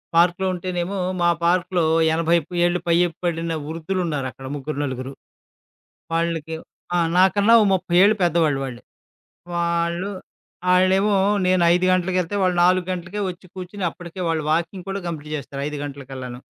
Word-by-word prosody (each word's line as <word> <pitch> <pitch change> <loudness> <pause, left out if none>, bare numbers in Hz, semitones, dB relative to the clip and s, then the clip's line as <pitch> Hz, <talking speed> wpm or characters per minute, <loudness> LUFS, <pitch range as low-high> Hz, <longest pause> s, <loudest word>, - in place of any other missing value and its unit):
పార్క్‌లో 175 +2 +3
ఉంటేనేమో, 180 +1 -3 0.2
మా 175 - +4
పార్క్‌లో 180 0 +2 0.3
80 165 +1 +3 0.3
ఏళ్ళు 175 0 +1
పై 170 - +4 0.3
పడిన 165 -1 -1
వృద్ధులు 165 +4 -3
ఉన్నారుక్కడ 135 -4 -4
ముగ్గురు, 145 +1 -5
నలుగురు. 130 -1 -4 1.0
వాళ్ళకి 165 -1 -1 0.4
ఆ! - - +3 0.2
నాకన్నా 200 +4 +5
ఓ - - +4
30 185 -1 -2
ఏళ్ళు 205 +2 +6
పెద్దవాళ్ళు 165 -4 +2
వాళ్ళు. 125 -3 -6 0.8
వాళ్ళు, 170 +2 0 0.6
ఆళ్ళేమో 190 +3 +3 0.3
నేను 185 0 +3
5 180 +1 +2
గంటలకెళ్తే, 185 0 0
వాళ్ళు 180 -1 +1
4 180 0 +3
గంటలకే 185 +3 -4
వచ్చి 180 +1 -9
కూర్చొని 185 +1 -5
అప్పటికే 175 +2 -9
వాళ్ళు 160 -2 0
వాకింగ్ 170 +3 -1
కూడా 195 +1 -3
కంప్లీట్ 155 -2 -5
చేస్తారు 140 -1 -7
5 150 0 -5
గంటలకల్లాను. 135 -3 -7
170 Hz, 140 wpm, -22 LUFS, 160-185 Hz, 1.0 s, ఏళ్ళు